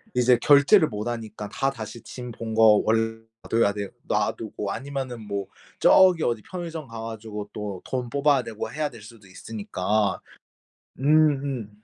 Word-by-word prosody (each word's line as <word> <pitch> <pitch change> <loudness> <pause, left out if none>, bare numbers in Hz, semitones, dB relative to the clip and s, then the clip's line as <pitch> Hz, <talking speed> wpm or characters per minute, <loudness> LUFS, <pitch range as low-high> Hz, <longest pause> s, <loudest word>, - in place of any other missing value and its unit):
이제 125 0 +5
결제를 150 +4 +6
못 105 +1 -4
하니까 110 -3 -5
다 135 +6 0
다시 115 -2 -8
짐 125 -1 -8
본 115 -1 -6
거 110 -1 +6
원래 115 0 +1 0.3
놔둬야 115 -3 +3
돼 100 -1 -4 0.2
놔두고 105 -2 -2
아니면은 130 0 -5
뭐 100 -2 -4 0.3
저기 185 -3 +6
어디 115 -2 0
편의점 165 -5 -6
가 115 -1 -8
가지고 110 -2 -6
또 100 -3 -5
돈 125 -2 -2
뽑아야 140 0 +2
되고 110 -2 -6
해야 150 0 -2
될 115 -4 -13
수도 110 -1 -14
있으니까 105 +1 -2 0.8
음음. 140 -5 +2
115 Hz, 295 characters per minute, -25 LUFS, 105-135 Hz, 0.8 s, 결제를